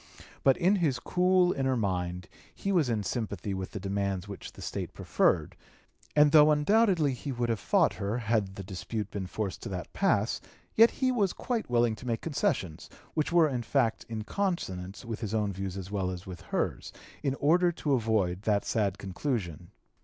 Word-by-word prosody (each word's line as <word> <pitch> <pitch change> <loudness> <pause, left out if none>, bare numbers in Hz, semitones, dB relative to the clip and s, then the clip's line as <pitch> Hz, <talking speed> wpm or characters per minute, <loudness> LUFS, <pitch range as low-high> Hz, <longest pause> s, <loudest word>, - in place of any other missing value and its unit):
But 135 - +5
in 185 +3 +3
his 150 -8 +1
cool 180 +6 +3
inner 130 -1 0
mind 90 -4 -2 0.3
he 200 - -2
was 165 -9 +3
in 110 -3 0
sympathy 100 -3 -3
with 95 -1 -4
the 105 - -6
demands 100 -1 -2
which 100 -2 -8
that - - -13
State - - -5
preferred, - - +1 0.6
and 150 -1 +6
though 150 -1 +8
undoubtedly 160 -1 +3
he 135 +3 -5
would 120 -2 -1
have 115 -2 0
fought - - +3
her, 100 +3 -2
had 110 -5 0
the 95 - -6
dispute 100 +2 -5
been 95 -3 -4
forced 100 0 -4
to - - -6
that 90 -2 -6
pass, - - +1 0.3
yet 230 +1 +7
he 260 -1 0
was 205 -7 +1
quite 235 - -3
willing 120 -2 +2
to 125 - -9
make 115 -2 -1
concessions, 95 - -2 0.2
which 155 +2 0
were 170 -2 +5
in 130 -4 -2
fact 115 0 +1
in 110 -1 -4
consonance 105 - -3
with 115 -1 -4
his 110 -2 -3
own 105 -2 0
views 95 0 -4
as 95 0 -7
well 95 -3 -1
as 90 0 -6
with 90 -2 -8
hers, - - -2 0.3
in 135 -2 0
order 175 +5 +3
to 150 -3 -1
avoid 110 -7 +1
that 105 -1 +1
sad 100 -3 0
conclusion. 95 - -3
115 Hz, 190 wpm, -29 LUFS, 95-150 Hz, 0.6 s, though